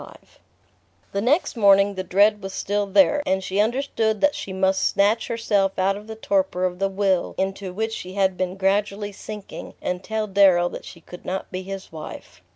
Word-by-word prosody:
XXXV - - -12 0.9
The 200 - -1
next 275 - +1
morning 200 -2 +5
the 190 -1 -4
dread 205 +3 +3
was 195 0 -6
still 205 0 -1
there, 290 +8 +4
and 190 -5 0
she 190 +2 -2
understood 225 -2 0
that 290 0 +3
she 195 - -6
must 190 0 +1
snatch 210 +3 +2
herself 205 -4 0
out 195 +1 +2
of 210 +1 -10
the 220 - -7
torpor 190 -4 0
of 180 0 -3
the 195 0 +1
will 190 -2 0
into 190 0 -2
which 220 +4 -3
she 185 -3 -7
had 190 -1 +1
been 185 +1 -3
gradually 200 +1 0
sinking, 210 +1 -9
and 180 +1 -3
tell 220 +1 -2
Darrow 190 -3 +4
that - - -8
she 170 - -12
could 180 +2 -12
not 190 +1 -4
be 185 0 -4
his 195 0 -8
wife. 155 -1 -10
195 Hz, 195 wpm, -23 LUFS, 190-210 Hz, 0.9 s, morning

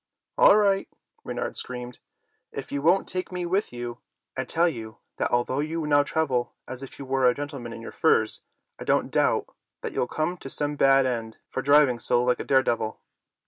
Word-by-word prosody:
"All 205 - +7
right!" 200 -2 +2 0.3
Reynard - - -4
screamed, 125 -1 -3 0.5
"if - - -6
you 140 - -2
won't 175 +6 +3
take 185 0 -3
me 180 -1 -3
with 190 +4 0
you, 120 0 -6 0.4
I 130 - -2
tell 170 +6 +2
you 110 -8 -5 0.2
that - - 0
although 120 +2 0
you 155 +2 -2
now 145 -1 +4
travel 140 -5 -1
as 130 0 -7
if 135 - -9
you 140 - -7
were 130 -1 +3
a 125 - 0
gentleman 140 -5 -6
in 115 - -8
your - - -7
furs, - - +2 0.4
I - - -5
don't - - +1
doubt - - +2 0.3
that - - -4
you'll 125 - 0
come 165 +4 -2
to 135 - -8
some 145 +2 0
bad 135 -1 +5
end 115 -3 -3
for - - -2
driving 140 -3 +4
so 120 +1 +2
like 125 0 +1
a - - -3
daredevil." 120 -5 +1
135 Hz, 195 wpm, -26 LUFS, 125-155 Hz, 0.5 s, All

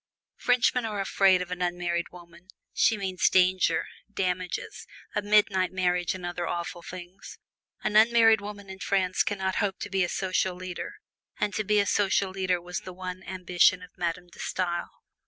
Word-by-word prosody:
Frenchmen 250 0 +2
are 215 -2 -3
afraid 190 -1 +3
of 180 - -12
an 180 0 -4
unmarried 175 -1 -1
woman 175 0 -15 0.3
she 225 - +3
means 190 -3 +1
danger, 185 0 +3 0.3
damages, 185 -2 -3 0.3
a 210 - 0
midnight 205 -3 +3
marriage 180 -1 0
and 180 -1 -7
other 175 -1 -3
awful 175 0 -4
things. 180 +2 -10 0.5
An 210 - -1
unmarried 225 0 +6
woman 205 -1 -8
in 190 0 -9
France 185 -1 +1
can 205 - 0
not 190 -1 -1
hope 200 -3 0
to - - -5
be 190 -1 +2
a 175 - -1
social 185 -1 0
leader; 180 -1 -6 0.5
and 210 -1 0
to 215 +3 -1
be 210 +1 +2
a 200 - +3
social 195 -1 +1
leader 185 -2 0
was 180 +1 -5
the 185 - -9
one 185 0 -6
ambition 180 0 +2
of 180 - -14
Madame 175 0 -3
De - - -16
Stael. 175 -2 -2
185 Hz, 175 wpm, -27 LUFS, 180-200 Hz, 0.5 s, unmarried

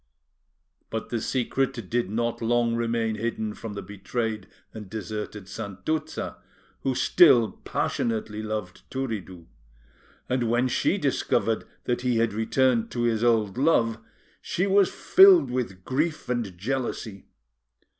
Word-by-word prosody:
But 110 -1 -4
the 115 -2 -2
secret 130 +2 0 0.2
did 120 -5 0
not 115 +3 -1
long 120 0 +2
remain 115 -1 0
hidden 110 -1 -2
from 110 -1 -7
the 100 - -6
betrayed 105 +1 -4 0.3
and 105 -3 -9
deserted 105 -1 -6
Santuzza, 115 +11 -4 0.4
who 135 -1 -1
still 135 -11 +5
passionately 110 -2 -2
loved 105 -4 -5
Turiddu; 105 -10 -5 0.8
and 125 -2 0
when 120 +2 +2
she 125 - +1
discovered - - 0 0.2
that 120 0 -1
he 125 -2 +1
had 115 -2 +1
returned 115 +2 +2
to 120 - -3
his 115 -1 +1
old 110 -2 +2
love 115 -7 +3 0.4
she 180 - -1
was 200 -1 +4
filled 380 - +6
with 95 -8 -3
grief 155 +4 -1
and 115 -7 -2
jealousy. 115 -2 -4
115 Hz, 125 wpm, -26 LUFS, 110-125 Hz, 0.8 s, filled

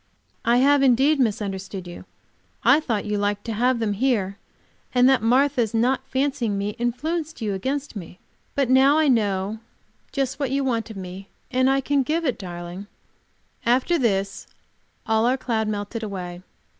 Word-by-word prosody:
"I 235 +1 +3
have, 280 +2 +4
indeed, 275 +3 +4
misunderstood 195 -5 -2
you. 175 0 -10 0.6
I - - +6
thought 230 -9 -2
you 210 -1 -1
liked 205 0 -1
to 230 - -3
have 245 +3 +2
them 220 -3 0
here, 205 -4 0 0.6
and 250 0 +6
that 265 -3 +4
Martha's 245 -1 +2
not 260 +3 +1
fancying 265 -6 0
me 200 +1 -1
influenced 310 +7 -2
you 215 -4 -2
against 265 +8 -3
me. 180 -2 -8 0.4
But 275 -2 +2
now 265 +4 +5
I 315 -1 +3
know 210 -4 +1 0.5
just 270 -1 -2
what 280 -3 0
you 275 +1 0
want 230 -4 -1
of 220 - -8
me, 190 +1 -8 0.2
and 255 +1 +3
I 270 0 +2
can 280 +1 +1
give 320 +5 -1
it, 260 - -1
darling." 175 +1 -7 0.8
After 255 +8 +2
this 195 -5 -1 0.6
all 220 +1 +2
our 255 +2 +2
cloud 225 -4 -1
melted 210 +2 -3
away. 180 -4 -6
235 Hz, 165 wpm, -23 LUFS, 205-270 Hz, 0.8 s, I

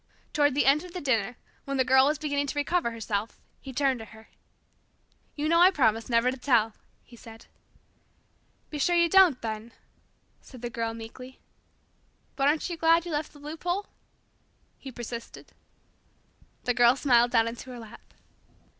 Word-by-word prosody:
Toward 290 -2 +2
the 290 - +2
end 285 +4 +4
of 360 -1 -11
the 365 - -4
dinner, 245 - -1 0.3
when 275 0 -3
the 260 - +2
Girl 265 +1 +5
was 300 +1 +1
beginning 285 -1 -2
to 290 - -5
recover 290 -1 0
herself, 225 -2 -4 0.2
he 270 - -9
turned 265 -1 0
to 225 - -8
her. 220 0 -16 1.1
"You 300 +1 -2
know 335 +2 +4
I 360 - +8
promised 230 - +1
never 235 +1 +3
to 260 - -7
tell," 230 -4 +2 0.3
he 240 - -17
said. 225 -1 -14 1.3
"Be 300 - -5
sure 350 +5 +2
you 340 0 +4
don't, 350 -6 +5
then," 220 +1 -5 0.7
said 250 -3 -14
the 240 - -4
Girl 230 -1 -3
meekly. 250 +3 -11 1.0
"But 275 -1 +1
aren't 300 +2 +1
you 345 -2 -5
glad 330 +1 +3
you 345 - -5
left 300 0 -3
the - - -17
loophole?" 340 +7 -4 0.9
he 270 - -9
persisted. 235 -1 -8 1.1
The 245 - +1
Girl 240 +1 +5
smiled 245 -4 +3
down 230 -2 +2
into 235 +3 -7
her 250 - -8
lap. 225 -1 -14
260 Hz, 170 wpm, -27 LUFS, 230-300 Hz, 1.3 s, I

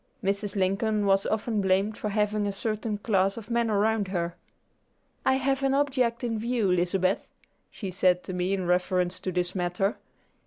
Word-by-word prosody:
Mrs. 200 +1 -1
Lincoln 205 +2 +1
was 195 0 +3
often 215 0 0
blamed 195 +3 +2
for 210 - -3
having 210 0 0
a - - 0
certain 215 +1 -2
class 195 -2 +1
of 225 0 -8
men 235 -1 +1
around 210 0 +2
her. 175 -2 -2 0.9
"I - - +4
have 270 +1 0
an 270 0 +2
object 260 -4 +1
in 225 -2 -1
view, 230 -4 +1
Lizabeth," 185 +2 +1 0.4
she 195 -4 -6
said 180 -1 +2
to 185 - -6
me 180 +2 0
in 190 -2 -3
reference 180 0 +1
to 185 - -3
this 180 0 -1
matter. 180 +3 -1
200 Hz, 170 wpm, -27 LUFS, 185-220 Hz, 0.9 s, I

